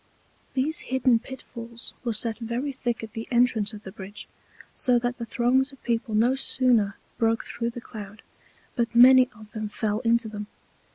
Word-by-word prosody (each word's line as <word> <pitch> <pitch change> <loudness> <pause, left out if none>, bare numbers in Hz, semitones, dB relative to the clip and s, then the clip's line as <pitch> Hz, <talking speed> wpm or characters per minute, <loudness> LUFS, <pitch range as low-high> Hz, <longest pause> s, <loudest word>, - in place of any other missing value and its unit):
These 295 +5 +2
hidden 255 -2 +3
Pit 265 +3 -9
falls 235 -1 -8
were 240 - 0
set 225 +1 -1
very 240 +5 -2
thick 240 -3 -3
at 220 -1 -8
the 225 -1 -5
Entrance 235 -4 +3
of 210 -1 -10
the 190 - -8
Bridge, 195 +2 -9 0.5
so 250 -1 +2
that 245 +1 -2
the 235 - -4
Throngs 260 +3 +2
of 275 - -18
People 230 -2 -1
no 235 +4 +4
sooner 245 -6 +2 0.2
broke 225 0 +2
through 235 0 -3
the 235 0 -8
Cloud, 210 -2 -10 0.5
but 235 -1 -1
many 255 +1 +8
of 215 -1 -14
them 215 -1 -4
fell 215 -1 -1
into 235 -1 +2
them. 210 -1 -6
235 Hz, 180 wpm, -26 LUFS, 220-250 Hz, 0.5 s, many